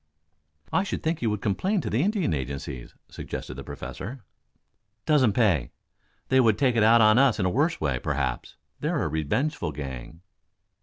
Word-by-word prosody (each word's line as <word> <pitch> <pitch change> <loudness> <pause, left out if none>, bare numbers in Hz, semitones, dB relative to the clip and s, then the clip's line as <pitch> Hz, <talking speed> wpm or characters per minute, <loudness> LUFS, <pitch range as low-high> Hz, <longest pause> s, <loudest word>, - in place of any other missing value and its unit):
"I - - +4
should 195 - -4
think 160 0 -1
you 115 - +1
would 105 -2 -3
complain 185 - 0
to - - -4
the 115 - +2
Indian 195 - +1
agencies," 70 -2 -5
suggested - - -7
the 70 +1 -8
Professor. 100 - -7 0.8
"Doesn't 130 -9 +4
pay. 90 - +2 0.6
They 130 - +4
would 110 -5 +4
take 130 -2 +2
it 115 - +3
out 115 +2 +6
of 110 +1 +6
us 135 -5 +4
in 95 - +1
a 90 - +1
worse 150 - +1
way, 70 -5 -1
perhaps. - - -3 0.2
They're - - -1
a - - 0
revengeful 80 - -1
gang." 70 +3 -7
105 Hz, 170 wpm, -26 LUFS, -, 0.8 s, out